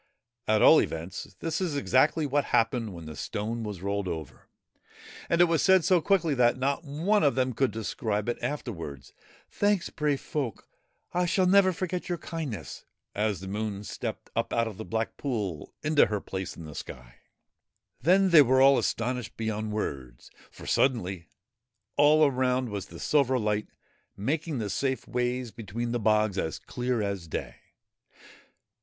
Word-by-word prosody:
At 110 0 +3
all - - +8
events, 85 +4 -5
this 165 +2 -2
is 170 -6 -1
exactly 145 +3 +2
what 145 +1 +1
happened 115 -1 +1
when 85 -2 -9
the 80 0 -8
stone 110 +9 -3
was 100 -4 -6
rolled 100 0 -1
right - - -1
over, 80 -4 -11 0.8
and 170 - +2
it - - +8
was 165 -4 +2
said 190 -3 +5
so 180 -2 +4
quickly 175 -4 +2
that 125 -2 +3
not 140 +5 -1
one 170 +9 +1
of 140 -5 +3
them 130 -1 +1
could 130 +3 +1
describe 110 -1 -3
it 120 - -2
after 145 -4 -3
wards: 75 - -8 0.2
' - - -29
Thanks, 205 -3 +2
brave 150 -3 0
folk 135 -8 -4 0.5
I 175 - 0
I - - +2
shall 185 +1 +2
never 190 0 +5
forget 180 0 -4
your 175 - -1
kindness/ 135 - -6 0.3
as 105 -3 -1
the 95 - -7
Moon 105 0 -3
stepped - - -6
up - - -1
out 115 -1 +1
of 105 -4 -7
the - - -6
black 110 +5 -2
pool 105 - -3
into 155 -1 +4
her 105 -1 -1
place 95 -1 -6
in 85 - -8
the 75 - -9
sky. - - -9 0.8
Then 185 +6 +4
they 160 -3 +9
were 130 -1 +4
all 135 0 +6
astonished 125 0 -2
beyond 110 -1 -2
words, 65 - -5 0.2
for, - - -13
suddenly, 95 -9 0 0.7
all 150 +2 +6
around 130 -2 +1
was 100 -2 -5
the - - -11
silver 135 -3 +2
light, 105 -2 -1 0.5
making 150 - -2
the 105 -4 -3
safe 130 +5 -1
ways 125 -1 -1
between 115 +3 -4
the 120 - 0
bogs 105 -2 +2
as 80 - -2
clear 125 -2 -2
as 100 -4 -3
day. - - -5
120 Hz, 175 wpm, -28 LUFS, 105-150 Hz, 0.8 s, they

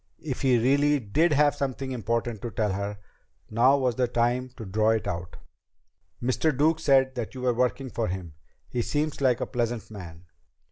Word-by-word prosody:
If 140 -5 -4
he 130 -3 +4
really 140 +4 +3
did 150 +10 +1
have 145 0 +4
something 135 -1 -3
important 115 -2 -2
to 120 - -4
tell 105 -2 -1
her, 100 +1 -3 0.5
now 125 +5 +5
was 130 -3 0
the 125 -1 +2
time 120 +2 0
to 115 - -7
draw 110 +3 +1
it 110 -1 +1
out. 90 +1 -5 0.8
"Mr. 130 +3 0
Duke 160 +3 +3
said 135 -4 +3
that 120 0 -5
you 130 - -6
were 125 -1 +2
working 125 +2 -1
for 115 -2 -1
him. 90 -3 -5 0.3
He 120 - -2
seems 150 +4 -2
like 125 -3 +2
a - - 0
pleasant 120 -4 -3
man." 90 -4 -10
125 Hz, 185 wpm, -26 LUFS, 110-135 Hz, 0.8 s, now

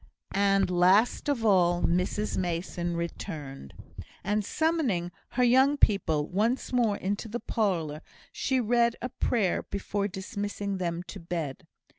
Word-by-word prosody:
And 195 -1 +3
last 185 +10 +3
of 240 -6 0
all, 175 -4 +4
Mrs 180 +5 0
Mason 175 -1 -2
returned; 150 - -6 0.5
and, 210 +2 0
summoning 260 - 0 0.2
her 250 - +2
"young 260 +4 +5
people" 160 - +2
once 225 +8 0
more 230 -5 +2
into 200 +4 -3
the 230 +3 -4
parlour, 165 -11 -1 0.3
she 265 -1 0
read 235 0 +2
a 250 - -2
prayer 225 -6 0
before 200 0 -3
dismissing 200 0 -4
them 170 -1 -2
to 195 - -9
bed. 165 -5 -5
200 Hz, 130 wpm, -28 LUFS, 175-225 Hz, 0.5 s, young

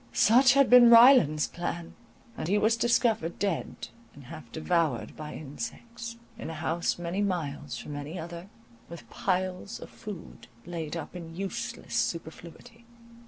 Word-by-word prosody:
Such 250 +3 +5
had 275 -1 +5
been 245 -1 +8
Ryland's 230 - +7
plan, 170 -1 -5 0.4
and - - -4
he 200 +4 +2
was 220 +2 +3
discovered 230 -7 +1
dead 195 -5 -3 0.3
and 145 - -13
half 135 -2 -11
devoured 160 -5 -1
by 155 -1 -8
insects, 230 - -7 0.2
in - - -6
a 165 - -6
house 160 +2 -1
many 175 +3 -3
miles 155 -7 -3
from 150 - -7
any 145 +5 -6
other, 170 +2 -8 0.4
with 170 0 -10
piles 185 +3 -2
of - - -11
food 210 -7 -10 0.2
laid 170 -2 -5
up 165 +2 -8
in 165 -2 -8
useless 195 +1 -5
superfluity. 170 +8 -4
175 Hz, 145 wpm, -28 LUFS, 160-220 Hz, 0.4 s, been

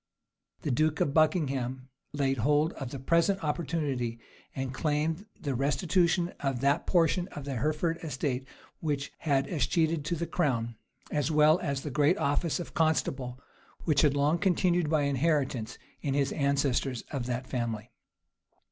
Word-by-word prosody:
The 145 - 0
duke 155 +4 +1
of 140 - +1
Buckingham 135 -5 +1 0.2
laid 135 -3 0
hold 150 +6 +2
of 135 - -6
the 140 - -6
present 170 +8 +2
opportunity, 145 -6 -1 0.4
and 130 -1 -3
claimed 155 +7 -1
the 140 - -2
restitution 170 +6 +1
of 135 -3 -1
that 140 +4 +2
portion 175 0 +2
of 145 -7 -8
the 135 -3 -3
Hereford 155 +5 0
estate 135 -4 -3 0.3
which 145 -3 -2
had 140 -3 +1
escheated 160 +1 +1
to 170 - 0
the 170 +1 -2
crown, 120 -10 0 0.4
as 150 -1 0
well 155 +2 +5
as 140 -5 -2
of 135 - -5
the 150 - -4
great 150 +7 +3
office 150 +1 0
of 175 - -7
constable, 135 -5 0 0.5
which 150 -4 +3
had 145 -3 +3
long 145 +4 +2
continued 180 -3 +2
by 155 -2 +2
inheritance 140 -4 0 0.2
in 140 -2 -1
his 140 -1 +1
ancestors 140 -3 0
of 130 -5 -3
that 125 +1 -2
family. 115 -4 -3
145 Hz, 155 wpm, -29 LUFS, 135-160 Hz, 0.5 s, well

